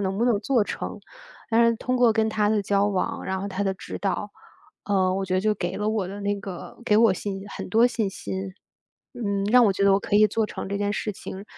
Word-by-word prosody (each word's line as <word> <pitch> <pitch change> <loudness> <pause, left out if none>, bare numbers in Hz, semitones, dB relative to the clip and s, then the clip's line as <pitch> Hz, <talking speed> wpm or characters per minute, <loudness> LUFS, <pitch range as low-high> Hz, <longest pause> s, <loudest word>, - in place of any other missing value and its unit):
能 190 -1 -1
不 235 - +2
能 235 -4 +3
做 235 -1 +2
成。 - - -5 0.5
但 230 +1 +5
是 230 - +1
通 255 +2 -1
过 240 -2 +5
跟 220 0 +1
他 210 -1 +1
的 215 -1 +2
交 200 +1 +2
往， 195 -3 -2
然 190 0 -2
后 200 - -3
他 200 0 -3
的 195 -1 0
指 - - -8
导， 205 +1 -2 0.5
啊， 190 -2 +1
我 195 0 -1
觉 185 0 -2
得 185 - +2
就 215 +1 +1
给 175 -2 -3
了 210 +1 -1
我 215 -4 -1
的 200 +1 -7
那 205 0 0
个 190 -3 -8
给 210 - +3
我 225 -3 +6
信 195 0 -5
很 - - -7
多 225 +4 +5
信 230 -5 -1
心。 190 0 -5 0.6
嗯， 200 -5 -2
让 245 +3 +6
我 200 - +3
觉 200 - -1
得 200 - +5
我 195 - +3
可 200 - -1
以 215 +1 +6
做 220 0 0
成 195 - -6
这 200 - -2
件 205 0 -1
事 210 - -2
情， 195 0 -8
205 Hz, 270 characters per minute, -25 LUFS, 195-220 Hz, 0.6 s, 我